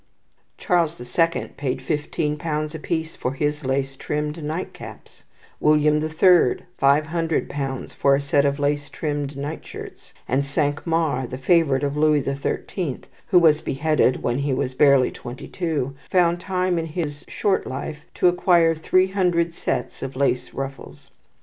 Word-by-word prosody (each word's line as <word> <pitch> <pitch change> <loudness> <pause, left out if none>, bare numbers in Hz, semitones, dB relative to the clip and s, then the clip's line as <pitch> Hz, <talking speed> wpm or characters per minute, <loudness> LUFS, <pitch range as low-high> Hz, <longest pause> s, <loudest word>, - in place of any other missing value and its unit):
Charles 170 -2 +1
the 125 - -10
Second 165 +7 0
paid 135 -2 -2
fifteen 150 +2 -2
pounds 150 0 -3
apiece 160 0 -3
for 125 - -3
his 150 +2 -2
lace 135 +1 -1
trimmed 150 +3 -3
night 155 +5 -4
caps; - - -12 0.4
William 150 0 +4
the 155 +1 -2
Third, 170 -3 +4 0.2
five 140 +2 +4
hundred 165 0 -1
pounds 135 -2 -4
for 140 0 +3
a - - 0
set 140 0 +2
of 140 0 +1
lace 145 0 -1
trimmed 145 -2 -3
night 145 +3 -5
shirts; - - -11
and 135 +3 +1
Cinq 145 +2 -1
Mars, 155 -7 0
the 130 - -5
favourite 140 -1 +3
of 140 0 -1
Louis 150 -1 +4
the 135 - -2
Thirteenth, 140 +2 -3 0.2
who 185 - +4
was 160 -3 +5
beheaded 140 -2 +1
when 120 +2 0
he 140 -1 0
was 130 0 -2
barely 135 -1 +4
twenty 130 +3 -9
two, 155 -7 -2 0.2
found 175 -1 +3
time 185 -1 0
in 165 - -3
his 150 -3 -4
short 200 -2 0
life 150 +3 -5 0.2
to - - +3
acquire 175 -2 +4
three 185 +4 +2
hundred 175 -3 +1
sets - - -3
of 135 -1 -5
lace 130 -2 0
ruffles. 135 - -7
150 Hz, 165 wpm, -23 LUFS, 140-165 Hz, 0.4 s, was